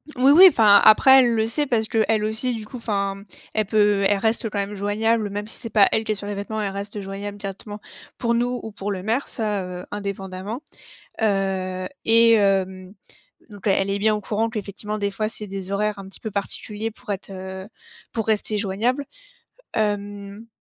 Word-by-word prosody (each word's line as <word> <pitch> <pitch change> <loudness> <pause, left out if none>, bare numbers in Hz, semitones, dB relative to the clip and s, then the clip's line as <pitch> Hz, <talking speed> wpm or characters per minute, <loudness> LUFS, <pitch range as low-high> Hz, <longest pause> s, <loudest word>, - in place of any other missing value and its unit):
Oui, 265 +2 +5
oui. 355 +6 +9
Enfin, 210 -7 +6
après, 265 +5 +8
elle 240 -3 +3
le 220 - +2
sait, 285 +6 -1
parce 220 -3 +1
qu'elle 220 -1 +1
aussi, 220 +4 0
du 220 - -7
coup, 250 - -9
enfin, 200 -4 -2
mmh, 200 +1 -13 0.3
elle 215 -1 +1
peut 205 -1 +2
elle 205 - +2
reste 220 +2 0
quand 205 - -5
même 200 +1 -2
joignable, 210 +2 0
même 205 +1 -4
si - - -8
c'est 230 - -7
pas 210 -2 +5
elle 220 - +2
qui 215 - -1
est - - -5
sur 200 - -4
les 205 - -3
vetêments, 215 +2 -4
elle 200 - -2
reste 200 +1 -5
joignable 200 +1 -6
directement 205 +1 -7 0.4
pour 235 -1 0
nous, 245 +1 0
ou 220 - -6
pour 205 0 -4
le 185 -2 -4
maire, 230 +7 -1
ça, 210 -4 -2
heu, 180 0 -7
indépendamment. 200 +3 -5 0.6
Heu, 190 -3 0 0.2
et 230 +1 +6
hem, 190 -2 +1 0.6
donc 205 0 -7
elle 195 0 +2
est 200 - +1
bien 215 +1 +3
au 210 - -4
courant 220 +3 -1
qu'effectivement, 210 -1 -5
des 200 -1 -1
fois, 215 +2 -2
c'est 215 -1 -6
des 195 -1 -6
horaires 210 0 -1
un 195 - -9
petit 195 - -6
peu 220 - -5
particuliers 210 +2 -3
pour 210 - -8
être, 195 0 -5
heu, 190 +1 -7 0.5
pour 225 -2 -2
rester 215 0 0
joignable. 225 +8 -1 0.7
Hem 205 0 -3
205 Hz, 205 wpm, -23 LUFS, 200-220 Hz, 0.7 s, oui